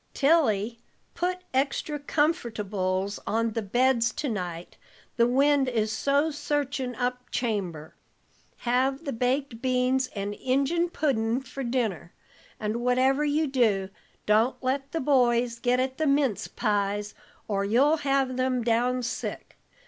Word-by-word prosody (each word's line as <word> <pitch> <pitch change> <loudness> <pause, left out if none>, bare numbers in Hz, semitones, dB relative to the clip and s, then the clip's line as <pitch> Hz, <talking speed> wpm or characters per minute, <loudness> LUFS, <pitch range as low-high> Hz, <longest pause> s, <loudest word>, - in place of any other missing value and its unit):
"Tilly, 240 -8 +2 0.3
put 365 +1 -2
extry 280 +3 0
comfortables 210 - -1
on 230 +1 +1
the 225 - -2
beds 240 +2 +2
to 285 - -3
night, 180 -5 -5 0.4
the 235 0 +4
wind 275 +1 +3
is 220 -3 0
so 280 +7 +1
searchin' 285 -3 -2
up 250 0 -3
chamber. 185 -10 -3 0.7
Have 265 +5 +1
the 280 - -2
baked 250 0 -1
beans 255 0 +1
and 200 0 -3
Injun 280 +9 0
puddin' 245 -7 0
for 270 +1 -7
dinner, 225 - -2 0.4
and 215 +1 -2
whatever 255 +4 +2
you 300 +2 +1
do, 220 -9 +1 0.4
don't 220 +4 +3
let 270 +2 -1
the 325 - -2
boys 245 -3 +2
git 245 +1 +2
at 260 +1 -2
the 315 - +1
mince 275 -6 +1
pies, 205 -1 -1 0.3
or 200 -2 0
you'll 265 +10 +3
have 275 -3 0
them 255 -1 0
down 245 +2 +1
sick. 240 - -5
250 Hz, 135 wpm, -27 LUFS, 220-275 Hz, 0.7 s, the